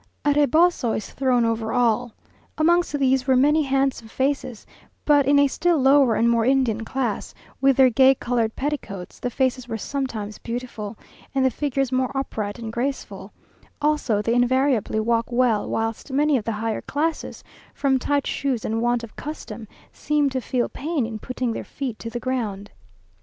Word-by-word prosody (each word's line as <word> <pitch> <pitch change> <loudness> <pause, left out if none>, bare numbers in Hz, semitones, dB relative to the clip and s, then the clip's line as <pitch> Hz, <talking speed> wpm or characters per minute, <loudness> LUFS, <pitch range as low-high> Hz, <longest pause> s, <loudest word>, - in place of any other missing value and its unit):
A 290 - +4
reboso 295 -2 +3
is 215 - -7
thrown 255 -3 +2
over 225 -1 -1
all. 240 -1 +1 0.4
Amongst 340 -1 +2
these 265 -1 +1
were 260 - +4
many 295 +5 +4
handsome 270 -4 0
faces, 260 -2 -2 0.4
but 290 -3 +4
in 285 0 +5
a 285 - +6
still 345 +4 +1
lower 270 -3 +4
and 230 - +2
more 235 -1 +3
Indian 245 -3 +1
class, 240 -2 -3 0.3
with 275 -1 +4
their 260 -2 +6
gay 265 +3 +5
coloured 235 -3 -1
petticoats, 260 -10 -5
the 250 - -2
faces 255 0 -1
were 225 -2 -3
sometimes 220 -5 -4
beautiful, 230 -3 -6 0.4
and 265 -1 +3
the 260 - +3
figures 275 -1 -1
more 255 -1 +1
upright 215 -6 -3
and 225 -2 -6
graceful; 265 +4 -4 0.5
also 295 -8 +1
they 230 - +1
invariably 245 -2 +2
walk 230 +1 +1
well 240 -3 +1
whilst 225 +4 -3
many 295 +2 +2
of 225 -5 -1
the 230 - -1
higher 220 +1 -2
classes, 315 +2 -3 0.3
from 270 -2 +1
tight 285 +1 0
shoes 260 -5 -2
and 225 +1 -1
want 240 0 +1
of 230 - -10
custom, 285 -6 -7 0.3
seem 295 -2 0
to 260 -1 -2
feel 245 0 -1
pain 300 -4 -2
in 220 -1 -6
putting 255 0 -3
their - - -5
feet 260 -6 -5
to 230 - -6
the 240 +1 -4
ground. 215 -6 -3
255 Hz, 175 wpm, -23 LUFS, 230-275 Hz, 0.5 s, a